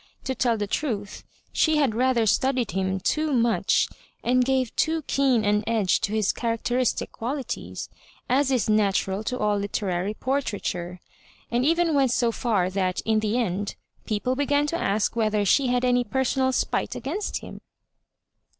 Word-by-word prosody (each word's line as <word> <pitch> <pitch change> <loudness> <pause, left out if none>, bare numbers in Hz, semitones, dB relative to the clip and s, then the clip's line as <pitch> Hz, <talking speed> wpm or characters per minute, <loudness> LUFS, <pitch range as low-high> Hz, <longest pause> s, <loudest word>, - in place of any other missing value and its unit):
To 265 - -2
tell 240 -2 +1
the 205 - -1
truth, 205 -3 -3 0.3
she 315 -1 +3
had 280 -7 +2
rather 245 0 +2
studied 255 +1 +1
him 190 0 -1
too 305 +10 0
much, 235 -3 +2 0.4
and 250 +1 +3
gave 260 -2 0
too 320 0 +1
keen 260 -6 +2
an 210 +1 +2
edge 215 -6 +2
to 200 - -1
his 215 -2 +1
charac 230 -1 -2
teristic 245 0 0
qualities, 260 +4 -5 0.4
as 270 +2 +2
is 255 -4 +1
natural 200 -1 +1
to 250 - -2
all 210 -3 +1
literary 200 -1 -2
por 270 +4 0
traiture, 180 -6 -4 0.5
and 240 +1 +1
even 330 +2 +2
went 275 -2 +3
so 240 -1 +2
far 215 -6 0
that, 185 -1 -1
in 220 -1 +1
the 215 +2 0
end, 205 -3 -2 0.3
people 225 +4 -1
began 285 +1 +1
to 295 - -2
ask 205 +3 0
whether 215 -2 +1
she 265 +7 +3
had 250 0 +1
any 245 0 +3
per 265 +4 -1
sonal 260 0 +1
spite 255 - -1
against 320 - -3
him. - - -10
235 Hz, 170 wpm, -25 LUFS, 205-265 Hz, 0.5 s, she